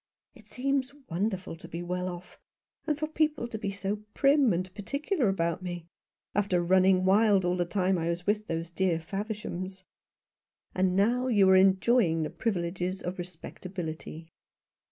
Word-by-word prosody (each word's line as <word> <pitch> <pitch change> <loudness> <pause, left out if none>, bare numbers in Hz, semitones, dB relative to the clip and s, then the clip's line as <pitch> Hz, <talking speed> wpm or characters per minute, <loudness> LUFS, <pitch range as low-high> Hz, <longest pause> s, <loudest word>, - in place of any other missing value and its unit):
It 215 -4 -18
seems 270 +3 -1 0.2
wonderful 190 0 -2
to - - -12
be 170 +1 -5
well 180 +1 -2
off, 175 0 -10 0.5
and 300 -2 +1
for 310 - -1
people 310 -5 0
to 220 -2 -6
be 200 - -2
so 200 +1 -2 0.2
prim 275 -3 +4
and 185 +1 -2
particular 280 - -1
about 170 -2 -1
me, 175 -2 -5 0.5
after 200 -3 +1
running 185 +1 +4
wild 200 -1 +4
all 180 0 +1
the 175 -1 0
time 185 0 +1
I 165 +1 -1
was 170 +1 -3
with 210 +1 0
those 165 +1 -3
dear 180 -1 +1
Favershams." 190 +1 -5 0.9
"And 185 0 +1
now 240 +6 +2
you 205 -6 +4
are - - +7
enjoying 190 -2 +4
the 155 - -3
privileges 185 -3 -2
of 180 +1 -4
respectability." 170 -2 -7
190 Hz, 155 wpm, -29 LUFS, 175-215 Hz, 0.9 s, are